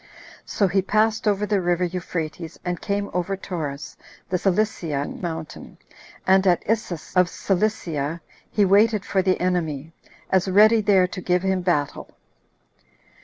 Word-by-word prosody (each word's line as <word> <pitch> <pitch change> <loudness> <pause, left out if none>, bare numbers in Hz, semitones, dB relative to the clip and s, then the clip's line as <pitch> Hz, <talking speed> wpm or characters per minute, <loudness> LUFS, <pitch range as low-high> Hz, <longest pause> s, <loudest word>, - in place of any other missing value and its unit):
So 200 - +1
he 195 +1 +2
passed 215 +3 +1
over 205 0 +2
the 205 -2 +1
river 175 0 +1
Euphrates, 170 -2 -4
and 180 -1 -3
came 200 0 -2
over 180 +2 -1
Taurus, 155 -7 -5 0.3
the 180 - 0
Cilician 175 -8 -1
mountain, 160 -3 -6 0.5
and 190 0 +4
at 175 -2 +3
Issus 205 -8 -2
of 180 -1 +4
Cilicia 170 -7 -1 0.3
he 205 - +2
waited 205 +1 +3
for 190 - +1
the 185 0 +1
enemy, 165 -4 -2 0.4
as 190 0 +2
ready 215 +4 +5
there 200 -3 +4
to 185 0 -6
give 180 +1 +1
him 190 -1 +1
battle. 150 -6 -2
185 Hz, 140 wpm, -23 LUFS, 170-200 Hz, 0.5 s, ready